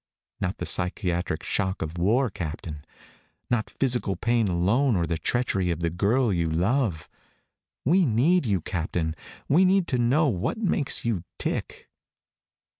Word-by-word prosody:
Not 90 +2 -2
the - - -4
psychiatric 90 -2 0
shock 95 -2 -1
of 80 +2 -6
war, 115 +7 +2
Captain. 75 -3 -6 0.7
Not 120 -3 0
physical 120 -7 0
pain 115 -2 +1
alone 100 +9 +2
or 85 -2 +1
the 85 -1 -2
treachery 100 -7 0
of 85 -1 -2
the 85 -1 0
girl 105 +6 +1
you 85 -2 0
love. 90 - 0 0.8
We 175 +4 +4
need 135 +8 +2
you, 95 -5 +1
Captain. 80 -1 -2 0.3
We 165 +7 +4
need 190 -1 +3
to 125 - 0
know 135 +7 +3
what 95 - -1
makes 175 - 0
you 105 -7 -1
tick." - - -4
100 Hz, 145 wpm, -26 LUFS, 85-130 Hz, 0.8 s, We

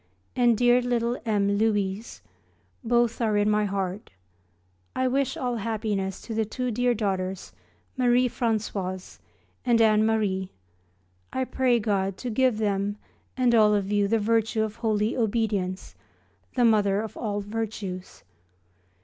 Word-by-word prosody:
and 240 -3 +3
dear 245 +1 +4
little 240 -1 0
M. 200 -1 +1
Louise; 205 -1 -1 0.6
both 240 0 +1
are 215 -2 +2
in 205 0 +2
my 210 0 +2
heart. 195 0 -3 0.9
I 260 0 +1
wish 270 +1 0
all 245 -2 -2
happiness 210 -3 -2
to 230 - -7
the 220 0 +1
two 250 +3 -3
dear 245 +2 +1
daughters 190 -3 -2 0.4
Marie 250 -1 +3
Françoise 205 -6 -3 0.4
and 240 -2 +3
Anne 215 -1 +4
Marie; 205 -4 0 0.8
I 260 - -1
pray 255 -2 +1
God 195 -3 -1
to 250 - -4
give 255 0 +2
them 205 -1 -1 0.4
and 250 -2 +3
all 215 -2 +5
of 200 0 -1
you 205 -1 +2
the 225 +3 +2
virtue 220 0 +1
of 220 0 -5
holy 215 -1 0
obedience, 210 -5 -1 0.6
the 245 -2 +3
mother 205 -3 +3
of 220 -2 -7
all 205 -2 -2
virtues. 205 -3 -5
220 Hz, 140 wpm, -26 LUFS, 200-235 Hz, 0.9 s, all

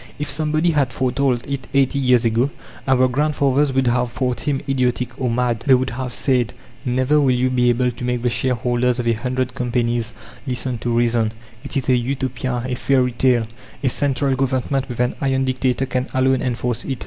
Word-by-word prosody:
If 150 0 -3
somebody 155 +3 +1
had 140 -5 +1
foretold 130 0 0
it 140 -1 -4
eighty 140 0 +3
years 125 -2 +3
ago, 115 +4 +2 0.4
our 130 -1 +4
grandfathers 140 +1 +1
would 135 0 +2
have 120 0 +1
thought 125 0 -1
him 140 -2 +1
idiotic 125 -2 0
or 125 - +1
mad. 120 -1 0
They 135 - +7
would 130 -1 -1
have 125 +1 -4
said: 125 -3 0 0.3
"Never 130 +4 +2
will 135 - +3
you 130 +1 +1
be 125 -1 +3
able 125 +1 +2
to 120 - -9
make 125 -1 -1
the 125 - +2
shareholders 125 0 0
of 125 - -2
a 115 - +4
hundred 125 +2 -2
companies 120 -2 -1 0.3
listen 125 -1 -2
to 120 - -3
reason! 115 -2 +1 0.3
It 140 +1 -3
is 135 - -2
a 130 - +4
Utopia, 125 -1 -2
a 130 - -2
fairy 125 0 +2
tale. 120 -1 +2 0.4
A 130 - +3
central 140 0 0
Government, 130 0 -1
with 120 - -6
an 125 0 +1
'iron' 135 -1 +1
dictator, 130 0 0
can 130 0 -2
alone 130 0 +2
enforce 120 -1 -2
it." 135 - -3
125 Hz, 195 wpm, -20 LUFS, 120-135 Hz, 0.4 s, They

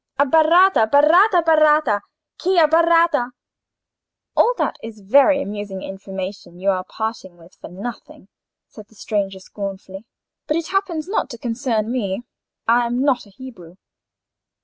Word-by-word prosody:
—Abbaratta, 320 - +4
baratta, 340 - +5
b'ratta—chi 310 - +1
abbaratta?" 330 -5 +3 1.0
"All - - +3
that - - -2
is 225 -1 -10
very 280 +8 +4
amusing 205 -2 -7
information 190 -1 -8
you 195 +2 +1
are 185 -1 -2
parting 220 -4 -6
with 170 +1 -19
for - - -12
nothing," 200 +1 -9 0.4
said 215 -1 -14
the 220 - -24
stranger, 200 -2 -3
rather 190 - -12
scornfully; 195 0 -8 0.4
"but 305 - 0
it 330 -1 -4
happens 365 -5 -2
not 395 -7 -2
to 240 - -8
concern 230 -2 -2
me. 210 -3 -3 0.4
I 235 +1 +3
am 245 +2 -1
no 280 -1 +4
Hebrew." 205 -6 -13
235 Hz, 130 wpm, -20 LUFS, 200-310 Hz, 1.0 s, baratta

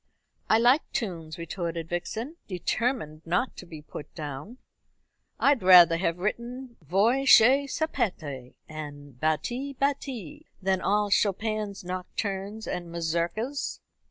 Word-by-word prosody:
"I 220 - +6
like 245 +6 +5
tunes," 165 -8 -3
retorted 170 -1 -4
Vixen, 220 - -4
determined 185 - -2
not 180 +10 0
to 180 - -9
be 155 -3 -10
put 150 - -9
down. 150 - -7 0.8
"I'd 280 -3 +4
rather 180 -2 +8
have 170 -1 0
written 235 +6 -4
'Voi 220 - +2
che 265 +4 +7
sapete,' 180 - -3
and 145 -4 -9
'Batti, 240 - -1
batti,' 280 +1 -3
than 190 -1 0
all 205 +1 +1
Chopin's 210 0 0
nocturnes 195 +3 -4
and 175 -1 -4
mazurkas." 170 - -2
195 Hz, 115 wpm, -27 LUFS, 170-240 Hz, 0.8 s, rather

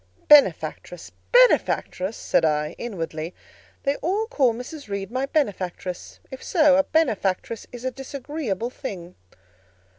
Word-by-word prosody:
"Benefactress! 295 -1 +3 0.2
benefactress!" 355 - +3
said - - +1
I 150 0 +1
inwardly: 165 -6 -5 0.5
"they 280 +1 0
all 400 +6 -1
call 275 - +2
Mrs. 250 +5 -8
Reed 200 0 -4
my 260 +2 -1
benefactress; 185 - -3
if 265 - -8
so, 305 -6 +4
a 285 - +4
benefactress 225 - 0
is 245 0 -9
a 260 - 0
disagreeable 260 -4 -4
thing." 180 -10 -7
245 Hz, 120 wpm, -24 LUFS, 185-285 Hz, 0.5 s, so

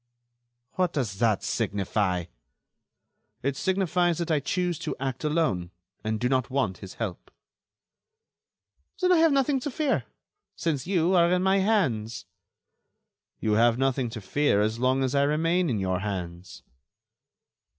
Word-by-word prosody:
"What 180 -2 +1
does 110 -10 -2
that 110 -4 +2
signify?" 95 -3 -1 1.2
"It 140 +1 0
signifies 180 0 +1
that 170 -1 -2
I 155 - +3
choose 175 +3 -1
to - - -4
act 135 0 -3
alone, 150 - 0 0.3
and 110 0 -1
do 125 - +1
not 130 -1 0
want 130 -9 -1
his 95 -2 -10
help." 105 -6 -5 1.7
"Then 365 -1 +2
I 360 - +6
have 325 -1 +5
nothing 275 0 +2
to 290 - -4
fear, 290 0 0 0.5
since 155 -4 -2
you 180 -1 +2
are 170 -1 +4
in 180 0 +2
my 190 +1 +3
hands." 130 - 0 1.1
"You 110 - 0
have 115 +2 +4
nothing 135 -2 0
to 110 -1 -7
fear 125 +2 +1
as 110 +2 0
long 130 +2 +2
as 130 0 -1
I 140 - +3
remain 165 +4 +1
in 115 - 0
your 95 -2 -1
hands." 90 -3 -6
135 Hz, 145 wpm, -26 LUFS, 110-175 Hz, 1.7 s, I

